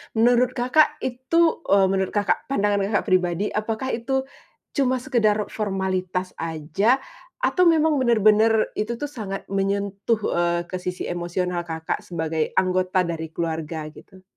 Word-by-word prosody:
Menurut 245 +3 +3
Kakak 295 +5 +3
itu, 260 +7 +1
eee- 195 -1 +5
menurut 190 -1 0
Kakak, 205 -1 0
pandangan 205 -6 +1
Kakak 205 - +1
pribadi- 185 0 +1
apakah 225 +4 -3
itu 265 +3 -1 0.5
cuma 260 -3 +1
sekadar 215 -6 +2
formalitas 185 -3 -2
aja 165 - 0 0.4
atau 365 -6 +3
memang 315 -3 +3
benar-benar 220 -2 +4
itu 230 +3 -1
tuh 290 +4 -5
sangat 200 -7 -5
menyentuh, 200 +2 0 0.2
eee, 170 0 +1
ke 185 - -3
sisi 180 0 -4
emosional 175 0 -3
Kakak 160 0 -3
sebagai 160 -2 -3
anggota 185 0 +2
dari 165 -1 -4
keluarga, 160 -1 -4
gitu? 185 +3 -16
200 Hz, 135 wpm, -23 LUFS, 180-235 Hz, 0.5 s, eee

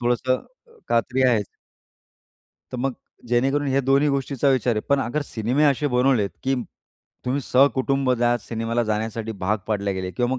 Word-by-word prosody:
थोडंसं 125 +1 +1
अ, 475 -2 -19
कात्री 125 +3 +1
आहेच. 110 -5 +1 1.2
तर - - -3
मग 135 +2 -1 0.4
जेणेकरून 135 +4 +1
हे 135 +1 +2
दोन्ही 135 +2 +3
गोष्टींचा 140 -1 0
विचार 125 -3 +2
आहे. 105 - -1
पण 140 0 +3
अगर 145 +6 -2
सिनेमे 120 +7 0
असे 145 0 +2
बनवलेत, 125 -5 +2
की 135 +1 +1 0.7
तुम्ही 130 +3 0
सहकुटुंब 135 0 +2
जा 120 0 +3
सिनेमाला 115 +1 -2
जा 110 -2 -1
जाण्यासाठी 110 +1 -3
भाग 105 +4 0
पाडले 100 -2 -1
गेले 95 -1 -4
किंवा 120 +8 -1
मग - - -3
125 Hz, 170 wpm, -23 LUFS, 115-135 Hz, 1.2 s, दोन्ही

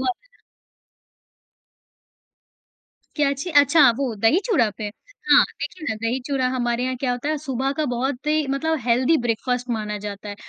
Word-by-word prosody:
वो - - -3
वाला। - - -6 2.8
क्या 295 -2 +2
अच्छी? 280 +5 -4
अच्छा, 290 -2 +6
वो 270 -4 -1
दही 225 - +4
चूरा 290 - +2
पे। 215 - -4 0.4
हाँ, - - +8 0.2
देखिए 340 -4 -6
ना 220 - -1
दही 235 +3 -1
चूरा 270 -3 0
हमारे 240 -1 -1
यहाँ 255 0 -1
क्या 255 0 -1
होता 245 +4 -3
है, 310 - 0
सुबह 270 -2 -2
का 310 - 0
बहुत 260 +3 -3
ही 305 0 +2
मतलब 315 +4 0
हेल्दी 250 +6 +2
ब्रेकफास्ट 245 +2 -2
माना 210 -2 -2
जाता 205 0 -7
है 205 - -6
260 Hz, 165 wpm, -22 LUFS, 240-290 Hz, 2.8 s, हाँ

